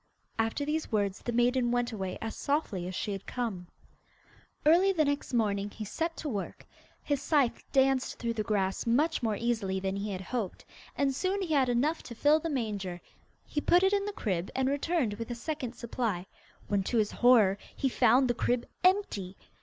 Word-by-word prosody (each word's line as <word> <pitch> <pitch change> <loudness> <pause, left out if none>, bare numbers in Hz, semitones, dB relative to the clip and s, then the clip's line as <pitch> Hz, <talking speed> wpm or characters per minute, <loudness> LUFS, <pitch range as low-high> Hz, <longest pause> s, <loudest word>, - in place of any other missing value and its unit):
After 225 +6 0
these 310 0 -2
words 200 -3 0
the 240 - -3
maiden 240 +1 +2
went 245 0 0
away 190 -4 -4
as 225 - -4
softly 245 - -1
as 185 - -5
she 210 - -2
had 195 -1 -6
come. 215 -8 -3 1.0
Early 350 +6 +6
the 320 -5 +2
next 285 0 -1
morning 205 -4 +1
he 215 +1 -7
set 330 - -3
to 310 - -5
work. 210 -8 -4 0.4
His 285 -2 -1
scythe 280 -5 +1
danced 270 -1 +2
through 235 -1 -2
the 220 - -2
grass 195 -1 -1
much 295 +8 +2
more 220 -3 0
easily 210 -4 -1
than 190 0 -2
he 205 +1 -3
had 185 -1 -4
hoped, 210 +1 -4 0.3
and 275 -1 +2
soon 380 +7 -1
he 330 -4 -1
had 265 -3 +3
enough 280 +7 +1
to 235 - -9
fill 295 +6 +4
the 330 - -3
manger. 205 - -3 0.5
He 295 - -2
put 355 +4 +4
it 385 +1 +4
in 400 0 +1
the 415 - -3
crib, 190 - -2
and 265 0 +1
returned 285 -3 0
with 230 +3 -6
a 240 - -3
second 255 -1 -4
supply, 225 -6 -2 0.4
when 205 -1 +1
to 240 - 0
his 210 -2 +2
horror 220 -6 +5 0.2
he 275 - 0
found 255 +1 +4
the 240 - +2
crib 240 +1 0 0.2
empty. 360 - +1
240 Hz, 195 wpm, -30 LUFS, 205-285 Hz, 1.0 s, Early